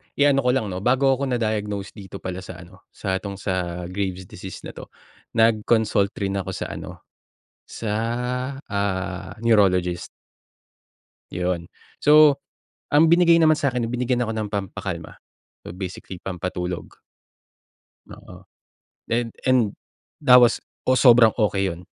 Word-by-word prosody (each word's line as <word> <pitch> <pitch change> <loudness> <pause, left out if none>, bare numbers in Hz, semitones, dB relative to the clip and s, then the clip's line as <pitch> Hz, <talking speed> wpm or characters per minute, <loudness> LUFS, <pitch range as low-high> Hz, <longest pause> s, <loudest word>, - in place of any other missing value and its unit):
iano 145 -1 +4
ko - - +4
lang 110 -6 -1
'no, 90 - -4
bago 130 +4 +3
ako 135 +1 0
na-diagnose 105 -5 -2
dito 100 -2 -11
pala 90 0 -4
sa 95 -2 -10
ano, 95 +2 -19
sa 95 -2 -3
'tong 100 0 -6
sa 90 -2 -3
Graves 95 -1 -3
disease 95 +1 -10
na - - -7
'to, - - -11 0.5
nag-consult 110 -2 +2
rin 100 0 -1
ako 95 - -5
sa - - -5
ano, - - -9 0.6
sa, 110 - -6 0.8
ah, 95 -2 -3
Neurologist. 90 -6 +2 1.3
Yun. 90 -1 -2 0.4
So, 150 -1 +7 0.5
ang 150 +3 +5
binigay 170 0 +5
naman 155 -1 +5
sakin, 130 -5 -1
binigyan 125 +1 -1
ako 110 - -3
ng 110 -1 -3
pampakalma. 95 -4 -5 0.5
So - - -8
basically 95 0 -7
pampatulog. 90 -1 -5 1.1
Oo. - - -14 0.6
Then 115 -1 -1
and 125 -5 +2 0.5
that 125 0 +8
was 120 -1 +3 0.2
ooh, 130 - +4
sobrang 120 -4 +6
okey 100 -3 +1
yun. 85 -1 -6
100 Hz, 130 wpm, -23 LUFS, 95-125 Hz, 1.3 s, that